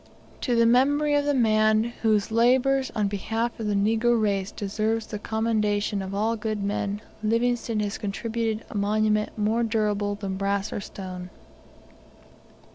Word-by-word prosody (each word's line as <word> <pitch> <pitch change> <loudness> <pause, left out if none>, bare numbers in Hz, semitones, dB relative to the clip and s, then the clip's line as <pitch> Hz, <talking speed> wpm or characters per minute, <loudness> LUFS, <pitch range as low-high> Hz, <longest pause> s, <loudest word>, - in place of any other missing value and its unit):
To 245 - 0
the 230 0 +4
memory 285 +5 +3
of 290 0 +2
the 290 - +2
man 215 -2 +3 0.2
whose 215 -1 +2
labours 260 +3 +3
on 210 -2 +1
behalf 225 +4 -2
of 220 - -3
the 205 - 0
negro 225 +3 +2
race 200 -2 0
deserves 215 +2 -2
the 210 - -6
commendation 210 -2 0
of 190 +1 -5
all 220 +3 +1
good 215 -2 -3
men, 205 0 -2 0.2
Livingstone 230 0 0
has 205 0 -3
contributed 220 +2 -2
a - - -9
monument 210 +1 +1
more 215 +2 +1
durable 210 -3 0
than 195 -2 -4
brass 200 0 -1
or - - -3
stone. 185 -2 -7
215 Hz, 150 wpm, -25 LUFS, 205-230 Hz, 0.2 s, the